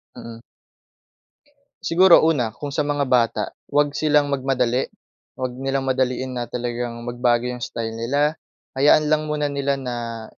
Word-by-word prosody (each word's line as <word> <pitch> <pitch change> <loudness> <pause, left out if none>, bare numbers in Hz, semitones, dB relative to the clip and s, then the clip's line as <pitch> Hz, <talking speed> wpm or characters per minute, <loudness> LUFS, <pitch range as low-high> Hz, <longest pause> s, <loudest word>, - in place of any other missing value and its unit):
Mm. 115 -1 -9 1.4
Siguro 175 -1 +6
una, 135 -9 +2
kung 145 -1 -6
sa - - +1
mga 145 -1 0
bata, 120 -4 +2 0.3
huwag 145 0 +2
silang 145 -1 +2
magmadali, 130 -2 0 0.5
huwag 130 -1 -3
nilang 135 0 -1
madaliin 130 0 -1
na 120 -2 -4
talagang 120 -1 -4
magbago 120 0 +1
yung 125 -1 -4
style 115 -1 -4
nila. 140 +7 0 0.4
Hayaan 145 +3 +4
lang 155 0 +1
muna 150 -1 -1
nila 140 -1 -1
na, 120 -3 -5
130 Hz, 140 wpm, -22 LUFS, 120-145 Hz, 1.4 s, Siguro